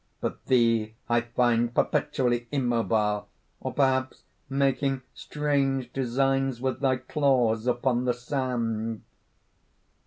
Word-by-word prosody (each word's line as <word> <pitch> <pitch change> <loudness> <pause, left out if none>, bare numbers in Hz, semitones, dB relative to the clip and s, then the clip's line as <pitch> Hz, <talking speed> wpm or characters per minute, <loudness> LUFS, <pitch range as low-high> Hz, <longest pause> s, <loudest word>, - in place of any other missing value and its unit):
But - - -4
thee 115 -3 +2
I 120 0 +3
find 120 0 +1
perpetually 120 -2 +1
immobile, 115 -6 0 0.3
or - - -4
perhaps 130 -2 0 0.3
making 135 -1 0
strange 135 -4 -1
designs 135 0 0
with 130 +1 -2
thy 135 -2 +2
claws 125 -5 +1
upon 125 0 +1
the 125 - +2
sand." 120 -4 -2
125 Hz, 100 wpm, -27 LUFS, 120-135 Hz, 0.3 s, I